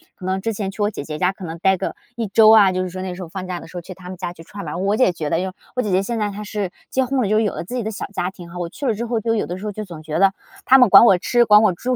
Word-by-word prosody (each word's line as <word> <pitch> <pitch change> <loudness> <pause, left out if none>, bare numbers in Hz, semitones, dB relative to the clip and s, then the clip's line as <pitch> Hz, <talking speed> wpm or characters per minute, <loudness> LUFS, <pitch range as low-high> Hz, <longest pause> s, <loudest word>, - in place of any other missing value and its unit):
可 185 - -10
能 190 +1 -1
之 225 - -1
前 200 -1 -3
去 205 - -7
我 205 - +2
姐 190 - -6
姐 150 0 -5
家 180 +3 +1
可 190 -1 -10
能 165 0 -6
呆 190 0 +3
个， 190 - -4 0.2
1 230 -2 -2
周 215 +2 +6
啊， 205 -4 +7
就 185 0 -1
是 185 - -4
说 185 +1 -7
那 185 -1 -5
时 185 - -9
候 170 - -9
放 185 +2 -6
假 180 -1 -4
的 - - -11
时 180 - -9
候 175 - -4
去 185 - -10
他 180 0 -12
们 185 - -7
家 175 -1 -5
去 165 - -13
串 200 +2 -9
门 150 - -5
儿。 - - -4
我 200 +3 0
姐 210 -8 +3
觉 155 -3 -4
得 165 - +1
就 185 0 -3 0.2
我 250 - +3
姐 210 - -3
姐 185 +1 +2
现 235 +2 -3
在 210 -1 0
她 205 +1 -7
是 205 -3 -4 0.2
结 260 0 +1
婚 265 +1 0
了， 210 - 0
就 215 +1 +3
有 215 -3 0
了 - - -5
自 215 +9 -7
己 245 - -2
的 220 - -3
小 210 - -5
家 180 -2 -1
庭 180 -3 -12
哈， 175 - -9
我 175 - -2
去 280 - -7
了 240 - +2
之 225 +3 -4
后 235 -1 -1
就 225 +1 0
有 215 - -1
的 175 - -5
时 200 - -8
候 210 - -2
就 215 +1 -6
总 165 -4 -10
觉 155 +1 -3
得， 195 0 +4 0.3
他 265 - +7
们 250 -4 +6
管 230 - +9
我 195 -5 +6
吃 240 +6 +2
管 210 -1 +7
我 210 - +4
住， 250 +8 -2
195 Hz, 405 characters per minute, -20 LUFS, 180-215 Hz, 0.3 s, 管